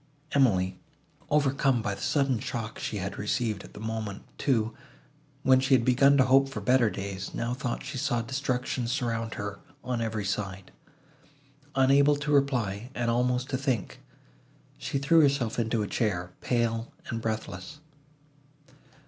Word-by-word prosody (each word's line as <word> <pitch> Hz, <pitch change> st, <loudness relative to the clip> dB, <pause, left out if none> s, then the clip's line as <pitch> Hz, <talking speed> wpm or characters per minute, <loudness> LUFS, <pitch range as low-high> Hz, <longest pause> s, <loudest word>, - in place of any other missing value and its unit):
Emily, 95 Hz, -10 st, +2 dB, 0.5 s
overcome 140 Hz, -4 st, +2 dB
by 100 Hz, -, -1 dB
the -, -, -8 dB
sudden 135 Hz, -5 st, +1 dB
shock 115 Hz, -1 st, -5 dB
she 105 Hz, -, -3 dB
had 100 Hz, +1 st, -4 dB
received, 105 Hz, -1 st, -1 dB
at -, -, -13 dB
the -, -, -8 dB
moment, 110 Hz, -2 st, -4 dB, 0.2 s
too, 115 Hz, -5 st, +1 dB, 0.7 s
when 130 Hz, -1 st, +6 dB
she 130 Hz, +1 st, +4 dB
had 115 Hz, -2 st, +2 dB
begun 140 Hz, +2 st, +5 dB
to 130 Hz, -, +6 dB
hope 135 Hz, +1 st, +4 dB
for 135 Hz, -, -5 dB
better 120 Hz, +2 st, +3 dB
days, 100 Hz, -1 st, -5 dB
now 120 Hz, +1 st, -1 dB
thought 125 Hz, -1 st, -3 dB
she 130 Hz, -1 st, -4 dB
saw 120 Hz, -1 st, +1 dB
destruction 125 Hz, -1 st, -2 dB
surround 115 Hz, -3 st, -2 dB
her 100 Hz, 0 st, -5 dB, 0.2 s
on 125 Hz, -2 st, -2 dB
every 110 Hz, -2 st, -2 dB
side. 95 Hz, -2 st, -3 dB, 1.0 s
Unable 140 Hz, +2 st, +5 dB
to 145 Hz, +1 st, -3 dB
reply, 125 Hz, -6 st, +1 dB
and 120 Hz, -1 st, 0 dB
almost 125 Hz, +1 st, +1 dB
to 130 Hz, -, +1 dB
think, 130 Hz, -8 st, -2 dB, 0.8 s
she -, -, -2 dB
threw 150 Hz, +4 st, +5 dB
herself 135 Hz, -6 st, +2 dB
into 115 Hz, -1 st, 0 dB
a -, -, -3 dB
chair, 90 Hz, -7 st, -1 dB
pale 115 Hz, +1 st, 0 dB, 0.2 s
and 115 Hz, -2 st, -3 dB
breathless. 110 Hz, +3 st, -4 dB
120 Hz, 150 wpm, -28 LUFS, 110-135 Hz, 1.0 s, when